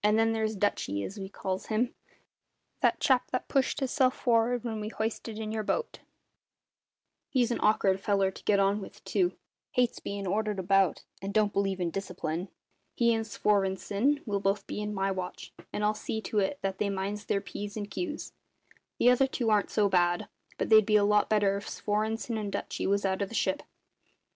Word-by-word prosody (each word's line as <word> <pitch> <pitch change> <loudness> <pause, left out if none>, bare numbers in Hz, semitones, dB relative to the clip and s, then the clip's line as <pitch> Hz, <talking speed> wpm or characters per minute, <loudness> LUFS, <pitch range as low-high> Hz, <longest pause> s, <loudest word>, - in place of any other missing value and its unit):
Then 220 +2 +4
there's 220 -1 0
`Dutchy', 100 - 0
as 200 - -7
we 190 0 -5
calls 190 -1 -4
him 230 +3 0 0.9
that - - +2
chap 260 -2 +3
that 255 - -2
pushed 275 +1 +1
hisself 260 -1 +2
for'ard 240 -1 +2
when 225 -3 -3
we 210 - -3
hoisted 220 0 -3
in 220 -1 -4
your 220 0 -1
boat 460 - -2 1.3
he's 250 -3 +2
an - - -1
awk'ard 195 -3 +3
feller 195 -1 +2
to - - -13
get 200 -1 +4
on 200 +1 +2
with, - - -11
too; 360 -2 +1 0.4
hates 250 -1 +1
bein' 200 0 -4
ordered 210 +2 0
about, 195 +1 +2 0.2
and 195 +2 -5
don't 210 -1 +3
believe 195 -1 0
in 175 -2 -1
discipline. 180 -2 -3 0.5
He 235 -1 +4
and 225 -1 -1
Svorenssen 205 +7 +1
will 205 -3 -1
both 195 0 0
be - - -4
in 210 0 -3
my 195 -1 0
watch, 185 -1 -5 0.2
and 210 - -3
I'll 210 0 +3
see 220 +1 -4
to 215 - -1
it 200 +9 0
that 190 -1 -2
they 205 - +1
minds 200 +2 -3
their 200 - +1
P's 205 +1 -6
and 205 -1 -3
Q's. 300 - -5 0.6
The 245 - +6
other 265 +2 +4
two 240 -4 -1
aren't 210 -1 +3
so 210 -2 +3
bad; 175 +1 +2 0.3
but - - -2
they'd 220 -1 +8
be 215 +1 +2
a 210 - +6
lot 210 0 +3
better 205 -2 +3
if 200 - -7
Svorenssen 220 +2 -1
and 205 -2 -3
Dutchy 200 - -3
was 200 +1 +1
out 190 +1 0
of 200 - -1
the 230 - -7
ship." 190 -3 +1
210 Hz, 195 wpm, -29 LUFS, 195-225 Hz, 1.3 s, they'd